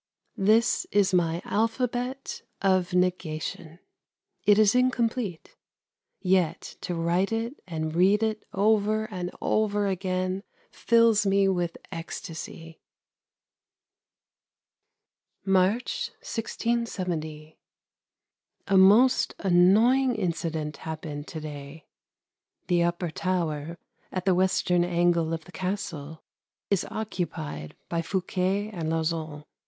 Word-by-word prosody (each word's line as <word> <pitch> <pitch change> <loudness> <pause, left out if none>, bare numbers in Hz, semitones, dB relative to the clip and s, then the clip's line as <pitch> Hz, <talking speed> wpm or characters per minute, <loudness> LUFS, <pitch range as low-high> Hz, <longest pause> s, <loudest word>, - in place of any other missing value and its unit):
That 220 +4 +3
is 200 -2 +3
my 170 -1 +1
alphabet 245 +4 -1 0.2
of 185 -2 +2
negation. 170 -2 -2 0.7
It 205 -1 +7
is 215 -1 +5
incomplete. 240 -7 0 0.6
Yet 180 -3 0
to 175 - -3
write 170 +4 +1
it 230 +4 -3
and 160 -2 -3
read 195 +5 +4
it 220 -1 -1
over 215 +1 +2
and 180 -2 -3
over 210 -1 +1
again 185 0 -1 0.3
fills 230 -3 +3
me 195 0 +3
with 175 -3 -1
ecstasy. 165 0 -7 2.6
March, 215 - +1
1670. 185 - -3 1.1
A 195 - +4
most 215 +7 +5
annoying 220 +8 +4
incident 160 -4 -2
happened 155 -2 -6
to 160 - -6
day. 150 0 -8 0.8
The 175 -2 +2
upper 175 0 0
tower, 165 -3 -2 0.3
at 185 0 -3
the 190 - +4
western 180 -1 +2
angle 170 -2 +2
of 165 -1 -4
the - - -14
Castle, 170 -5 -4 0.5
is 200 - +1
occupied 165 - -4
by 170 -1 -1
Fouquet 190 +3 -1
and 165 -6 -3
Lauzun. 160 -2 -2
185 Hz, 100 wpm, -27 LUFS, 165-210 Hz, 2.6 s, It